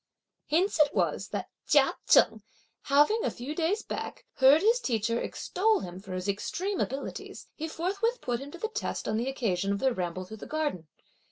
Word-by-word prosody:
Hence 345 +4 +2
it 295 -1 +4
was - - 0
that - - -4 0.2
Chia - - +5
Cheng - - +5 0.4
having, 295 - +4
a - - +1
few 255 +5 -6
days 345 +7 0
back, - - -6
heard 275 +5 +6
his 460 +3 +4
teacher 230 - 0
extol 430 +3 0
him 180 0 -7
for 190 -1 -8
his 185 +1 -4
extreme 360 - -2
abilities, 270 +2 -4
he 320 - -5
forthwith 395 +9 -1
put 240 -2 -2
him 275 +2 -8
to 345 - -9
the 440 - -2
test - - -3
on 215 - 0
the 240 +4 -1
occasion 200 -7 -1
of 200 - +1
their 260 +4 +1
ramble 185 -2 -3
through 220 +4 -9
the - - -9
garden. 295 - -2
275 Hz, 190 wpm, -29 LUFS, 215-360 Hz, 0.4 s, heard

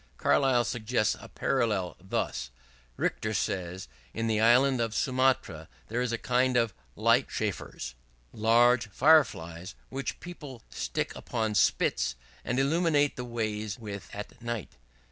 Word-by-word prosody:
Carlyle 130 -3 +3
suggests 115 -2 0
a - - -11
parallel 110 -9 0
thus: 90 -8 -3 0.5
"Richter 110 0 -1
says, 95 -3 -2 0.3
in 115 - -1
the 110 -1 +1
Island 125 +2 +5
of 115 -1 -1
Sumatra 130 - +1 0.2
there 120 +3 -1
is 125 -1 -1
a 115 - 0
kind 125 +1 +2
of 115 -3 +2 0.2
'Light - - +3
chafers,' - - -4 0.4
large 115 +1 +4
Fire 155 +9 +6
flies, 85 -3 -9
which 135 +1 -4
people 145 -9 -9
stick - - -3
upon 110 -1 -2
spits, 65 -9 +2 0.3
and 125 - -1
illuminate 145 +1 +2
the 125 - -5
ways 110 -3 -3
with 100 -5 -7
at 105 +4 -8
night. 115 - -4
115 Hz, 135 wpm, -29 LUFS, 105-130 Hz, 0.5 s, Fire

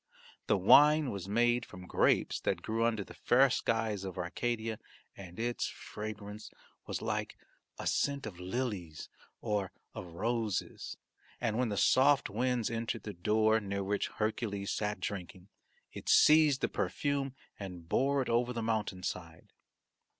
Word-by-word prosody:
The - - +3
wine 150 +9 +6
was 100 -1 -6
made 120 +2 +3
from 90 -4 -10
grapes - - +2
that - - -1
grew 115 +1 -1
under 110 -3 0
the - - -13
fair 130 +2 +4
skies 110 -5 0
of 95 -2 -6
Arcadia 110 +5 -2 0.4
and 90 -1 -10
its 120 +1 -1
fragrance 105 0 -7 0.4
was - - -3
like - - -2 0.4
a - - -6
scent 140 -2 0
of 95 -5 -7
lilies 95 -5 -4 0.3
or 105 -3 -1 0.2
of - - -7
roses, 115 0 -2 0.4
and 115 -3 -1
when 125 -2 +1
the 100 - -2
soft 140 +5 +4
winds 120 +1 0
entered 115 0 -3
the 105 - -6
door, 110 +4 +2
near 100 -1 -3
which 100 +1 -1
Hercules 105 -2 -2
sat 105 -1 -2
drinking, 95 -1 -6 0.4
it - - -6
seized 150 -3 +6
the - - +2
perfume 140 -2 -1 0.2
and 90 -4 -8
bore 135 +7 +2
it - - -9
over 120 +1 +1
the 115 -1 -3
mountain 110 -4 -1
side. 85 -3 -6
110 Hz, 150 wpm, -32 LUFS, 100-120 Hz, 0.4 s, wine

